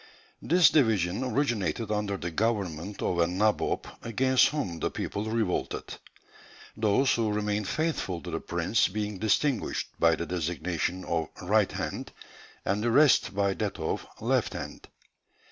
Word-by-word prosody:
This 175 +1 +5
division 110 - +2
originated 115 - -1
under 105 -1 -1
the 85 -2 -4
government 100 -2 -2
of 85 - 0
a 85 - +4
nabob 105 +5 +1 0.2
against 130 +3 +3
whom 115 - -3
the - - 0
people 105 - -4
revolted; 110 -4 -1 0.9
those 110 +5 +3
who 110 -2 0
remained 105 -1 -1
faithful 155 - -1
to - - -6
the - - -2
prince - - +1
being 105 0 -4
distinguished 110 +4 0
by 85 -1 +5
the 85 - -4
designation 90 +1 -2
of 80 -1 -1 0.2
'right 105 +2 +3
hand,' - - -5 0.5
and 100 +2 0
the 120 - +2
rest 135 -5 +4
by 100 -1 +2
that 105 -1 -3
of - - -3
'left - - +1
hand.' - - -7
105 Hz, 145 wpm, -28 LUFS, 90-115 Hz, 0.9 s, This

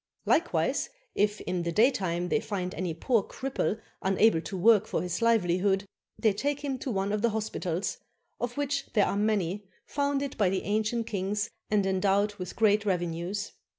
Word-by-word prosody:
Likewise - - +1 0.2
if 210 +1 +1
in 180 -1 -2
the 170 0 -2
daytime 180 -5 +2
they 225 - +2
find 185 -5 -3
any 185 -2 -2
poor 220 +8 +1
cripple 260 -1 -2 0.2
unable 195 -2 +3
to 190 - -5
work 215 +2 +5
for - - -1
his 180 +1 -3
livelihood, 195 -3 +2 0.3
they 215 -3 +3
take 285 +7 -1
him 275 -3 -3
to 265 - -4
one 195 -3 -1
of 210 0 0
the 235 - +3
hospitals, 205 -5 -2 0.4
of 245 +2 -3
which 285 -1 -1
there 210 -3 +4
are - - -1
many, 205 -2 0 0.2
founded 280 -1 -1
by 200 -3 +4
the 190 0 -1
ancient 215 +3 0
kings 205 +1 -2 0.2
and 210 -2 +2
endowed 195 +2 +2
with 180 -2 -6
great 210 -1 +3
revenues. 180 +1 -2
205 Hz, 170 wpm, -28 LUFS, 185-225 Hz, 0.4 s, work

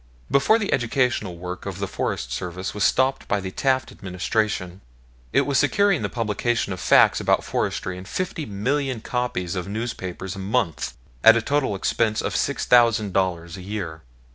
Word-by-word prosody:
Before 140 +11 +4
the 210 -3 -1
educational 120 -6 0
work 90 +2 -6
of 95 -2 -5
the 100 0 -2
Forest 65 -8 -3
Service 90 +8 -4
was 105 - -1
stopped 130 +4 +2
by 100 - +1
the 95 -1 -5
Taft 130 +4 0
Administration, 95 0 -2 0.5
it - - +4
was 140 -2 +1
securing 200 -4 +3
the - - -1
publication 115 -2 -1
of 90 - -7
facts - - +5
about - - +2
forestry 90 0 -2
in 90 - -10
fifty 175 - -3
million 130 +4 -1
copies 110 -8 -2
of 90 0 -3
newspapers 100 -4 -4
a - - -7
month 100 -3 -1 0.3
at 115 +1 +9
a - - +3
total 140 -7 0
expense 110 +3 0
of - - -2
$6000 95 -8 +2
a - - -8
year. 90 -5 -5
105 Hz, 165 wpm, -23 LUFS, 95-125 Hz, 0.5 s, at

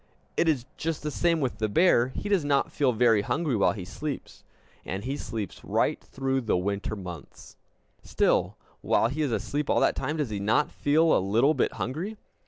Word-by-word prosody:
It 170 - +2
is 130 -6 0
just 160 -1 -3
the 150 - -2
same 170 +1 +1
with 130 -3 -2
the 110 -1 0
bear; 125 - +4
he 130 +10 -6
does 200 -6 +2
not 140 -1 +1
feel 135 -3 +2
very 115 -2 +4
hungry 145 +4 -1
while 105 - +3
he 95 -5 -7
sleeps. 145 +9 -6 0.4
And 95 +2 -4
he 135 +4 -2
sleeps 110 -7 -6
right - - 0
through 135 0 -2
the 110 -6 +1
winter 100 +3 -2
months! 90 -6 -10 0.5
Still, - - +1 0.2
while 115 - +2
he 150 +5 -3
is 145 -4 0
asleep 145 +5 -2
all - - +3
that - - +3
time, 150 +4 -2
does 145 -7 -2
he 105 - -3
not 110 +9 +1
feel 155 +3 +3
a - - +3
little 115 +10 +3
bit - - 0
hungry? 175 - -4
135 Hz, 195 wpm, -27 LUFS, 110-150 Hz, 0.5 s, bear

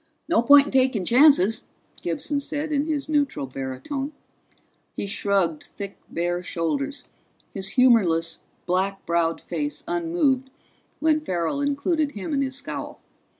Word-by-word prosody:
"No 330 -8 +3
point 280 +3 +7
in - - -6
taking 255 -7 +2
chances," 235 - +5 0.3
Gibson 175 - -2
said 295 +2 -3
in 290 +1 0
his 295 -3 -2
neutral 290 - 0
baritone. 135 - -5 0.8
He - - -4
shrugged 195 -5 0
thick 200 -1 -8
bare 175 +1 -1
shoulders, 275 - -3 0.5
his 195 -1 -3
humorless 185 -10 +4 0.3
black 190 +2 -1
browed 170 -1 +1
face 150 -3 -4
unmoved, 175 - 0 0.5
when 310 -1 +3
Farrell 185 - -2
included 285 +2 0
him 205 +8 -5
in 275 - +1
his 265 -1 -2
scowl. 280 - -5
230 Hz, 130 wpm, -24 LUFS, 175-285 Hz, 0.8 s, point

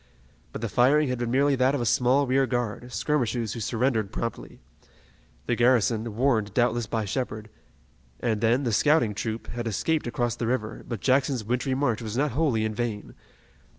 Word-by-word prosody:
But - - -7
the 115 - -1
firing 135 +6 +3
had 125 -1 -2
been 120 -1 -2
merely 140 +3 +3
that 130 +2 +2
of - - -1
a - - -1
small 130 +5 +3
rear 135 +1 +2
guard, 120 0 -3
skirmishers 120 -6 -1
who 115 - -6
surrendered 115 -1 0
promptly. 115 - -5 0.9
The - - 0
garrison, 115 -2 +2
warned 115 -5 +1
doubtless 120 -2 +1
by 110 -2 -2
Shepard, 110 -1 -4 0.7
and 110 -3 -1
then 120 +4 +2
the 120 -4 -1
scouting 145 -1 +3
troop, 110 +1 -4
had 120 -1 -4
escaped 150 +7 -1
across 120 -1 -1
the 120 -1 -3
river, 115 -3 -2
but 115 -5 -5
Jackson's 130 -2 +1
wintry 125 +4 -1
march 125 -5 0
was 110 0 -5
not 145 +1 +1
wholly 130 -7 +1
in 110 - -2
vain. 110 -2 -4
120 Hz, 180 wpm, -26 LUFS, 110-130 Hz, 0.9 s, firing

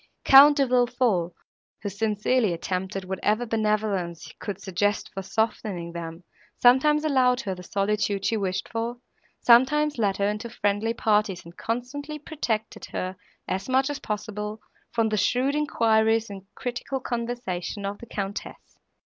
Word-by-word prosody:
Count 285 +2 +9
De 275 - +4
Villefort, 245 -8 +2 0.5
who - - -2
sincerely 210 +1 +1
attempted 185 +2 -3
whatever 210 +5 0
benevolence 210 -7 -1
could 200 -2 -5
suggest 205 +2 -1
for 195 - -4
softening 195 -4 -2
them, 170 0 -7 0.3
sometimes 300 +5 +5
allowed 255 -3 +3
her 195 -6 -3
the 180 - -9
solitude 200 +1 -1
she 230 - +2
wished 190 -3 -2
for, 230 +1 -3 0.4
sometimes 280 +4 +4
led 200 -3 +1
her 200 - +1
into 210 +3 -3
friendly 220 0 0
parties, 210 -6 +1
and 170 +1 -12
constantly 275 +6 -4
protected 245 -8 -3
her, 185 +1 -4 0.3
as 190 +6 -3
much 265 +2 +2
as 290 - -5
possible, 210 0 -4 0.3
from 225 -1 +1
the 215 - 0
shrewd 255 +7 +2
enquiries 225 -6 +2
and 195 -1 -9
critical 250 +2 -4
conversation 235 -6 -4
of 200 +1 -4
the 235 - -11
Countess. 200 -1 -6
220 Hz, 140 wpm, -26 LUFS, 195-245 Hz, 0.5 s, Count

